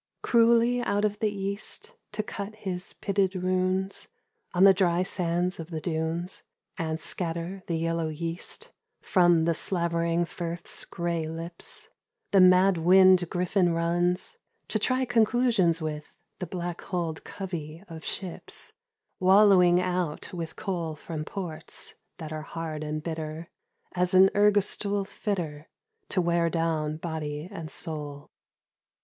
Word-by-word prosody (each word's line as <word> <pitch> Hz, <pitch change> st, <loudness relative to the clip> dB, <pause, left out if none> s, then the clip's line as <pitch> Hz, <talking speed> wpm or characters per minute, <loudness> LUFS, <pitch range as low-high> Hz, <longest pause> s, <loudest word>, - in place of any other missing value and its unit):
Cruelly 235 Hz, +1 st, +4 dB
out 205 Hz, -3 st, +1 dB
of 210 Hz, 0 st, -1 dB
the 215 Hz, -, +2 dB
east 200 Hz, -, -4 dB, 0.2 s
to 215 Hz, 0 st, -1 dB
cut 210 Hz, 0 st, -6 dB
his 185 Hz, -4 st, -3 dB
pitted 195 Hz, -1 st, 0 dB
runes 185 Hz, +1 st, 0 dB, 0.4 s
On 180 Hz, +1 st, +3 dB
the 195 Hz, 0 st, +9 dB
dry 180 Hz, -2 st, +2 dB
sands 180 Hz, 0 st, 0 dB
of 165 Hz, 0 st, -7 dB
the 160 Hz, -2 st, -4 dB
dunes, 165 Hz, +2 st, -2 dB, 0.3 s
and 160 Hz, -1 st, -2 dB
scatter 170 Hz, +3 st, -2 dB
the 170 Hz, -, -1 dB
yellow 165 Hz, 0 st, -1 dB
yeast 165 Hz, +2 st, -5 dB, 0.3 s
From 175 Hz, -3 st, +4 dB
the 170 Hz, -, +3 dB
slavering 170 Hz, -1 st, +1 dB
firth's 170 Hz, 0 st, -3 dB
grey 170 Hz, -2 st, -2 dB
lips, 165 Hz, +2 st, -3 dB, 0.4 s
the 195 Hz, -, +6 dB
mad 185 Hz, 0 st, +6 dB
wind 185 Hz, 0 st, +6 dB
griffin 180 Hz, 0 st, +1 dB
runs 175 Hz, -, 0 dB, 0.3 s
To -, -, 0 dB
try 255 Hz, 0 st, +1 dB
conclusions 225 Hz, -8 st, +3 dB
with 150 Hz, -1 st, -5 dB, 0.3 s
the 180 Hz, -, -4 dB
black 175 Hz, 0 st, -4 dB
hulled 170 Hz, -4 st, -3 dB
covey 170 Hz, -3 st, -6 dB
of 160 Hz, -2 st, -9 dB
ships 185 Hz, -4 st, -5 dB, 0.5 s
Wallowing 185 Hz, -2 st, +6 dB
out 180 Hz, -4 st, -2 dB
with 165 Hz, -2 st, -5 dB
coal 170 Hz, -6 st, -3 dB
from 155 Hz, 0 st, -6 dB
ports 160 Hz, -5 st, -4 dB, 0.2 s
that 160 Hz, -1 st, -7 dB
are 155 Hz, -, -4 dB
hard 155 Hz, -1 st, -5 dB
and 155 Hz, 0 st, -4 dB
bitter 160 Hz, 0 st, -5 dB, 0.4 s
As 180 Hz, 0 st, +1 dB
an 190 Hz, +1 st, +8 dB
ergastule 205 Hz, -1 st, +2 dB
fitter, 165 Hz, -8 st, -4 dB, 0.4 s
to 185 Hz, -, +1 dB
wear 170 Hz, 0 st, +2 dB
down 160 Hz, -2 st, -1 dB
body 155 Hz, -1 st, -4 dB
and 165 Hz, -6 st, -7 dB
soul. 150 Hz, -4 st, -3 dB
175 Hz, 130 wpm, -27 LUFS, 165-190 Hz, 0.5 s, the